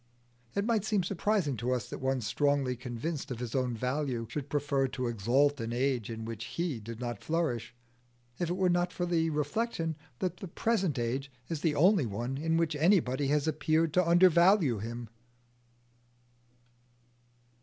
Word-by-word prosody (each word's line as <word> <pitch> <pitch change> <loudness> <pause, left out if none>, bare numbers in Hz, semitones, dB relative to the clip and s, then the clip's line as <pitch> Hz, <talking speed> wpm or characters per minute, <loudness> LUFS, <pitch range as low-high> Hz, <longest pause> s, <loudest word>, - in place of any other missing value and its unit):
It 200 - +1
might 225 -3 +1
seem 210 -3 +1
surprising 190 -5 0
to 120 +3 -1
us 125 -4 -2
that - - -5
one 130 -1 0
strongly 140 +3 +1
convinced 125 +6 -4
of 125 - -4
his 120 -1 -5
own 130 -3 0
value 125 -1 -1
should 145 -1 -4
prefer 140 -2 +1
to 130 0 -4
exalt 125 +6 +2
an 115 0 -3
age 125 -2 0
in 115 -1 -5
which 115 -1 -5
he 165 -8 -3
did 115 +1 -8
not 120 -4 -5
flourish, 125 -9 -1 0.6
if 175 - -1
it 175 - 0
were 185 -1 +3
not 175 0 +2
for 175 - -2
the 165 -2 +1
reflection 160 +3 -1 0.2
that 180 +4 -2
the 190 - -7
present 190 - 0
age 130 +4 -2 0.2
is 160 -3 -3
the 160 -3 +1
only 170 - +4
one 120 +6 -3
in 160 +1 +1
which 165 -2 +1
anybody 145 -5 +3
has 150 +1 +1
appeared 155 +1 +1
to 180 -2 +3
undervalue 175 - +5
him. 120 +2 -5
145 Hz, 165 wpm, -30 LUFS, 125-170 Hz, 0.6 s, undervalue